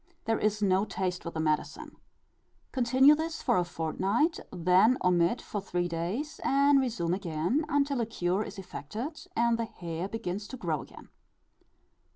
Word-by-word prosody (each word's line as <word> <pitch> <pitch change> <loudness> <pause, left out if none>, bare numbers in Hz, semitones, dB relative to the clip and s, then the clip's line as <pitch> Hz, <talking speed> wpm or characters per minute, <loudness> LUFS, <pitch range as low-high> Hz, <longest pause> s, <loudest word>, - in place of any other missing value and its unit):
There 225 0 +1
is 210 0 0
no 190 0 +3
taste 185 -4 -3
with 170 - -6
the - - -2
medicine. 155 -1 -2 0.8
Continue 260 +3 +5
this 320 +1 -3
for - - +3
a 180 - +3
fortnight, 190 - 0
then 185 +7 +4
omit 180 +4 +2
for 205 - -4
three 175 -2 -1
days, 180 - -3
and 280 +1 +4
resume 180 -10 -1
again 180 - -1
until 280 -3 +1
a 225 - -1
cure 185 -2 -1
is 210 -1 -6
effected 215 - -6
and 235 0 +2
the 230 - 0
hair 170 -4 -5
begins 205 -2 -4
to 260 - -8
grow 160 - -2
again. - - -13
200 Hz, 160 wpm, -29 LUFS, 175-250 Hz, 0.8 s, Continue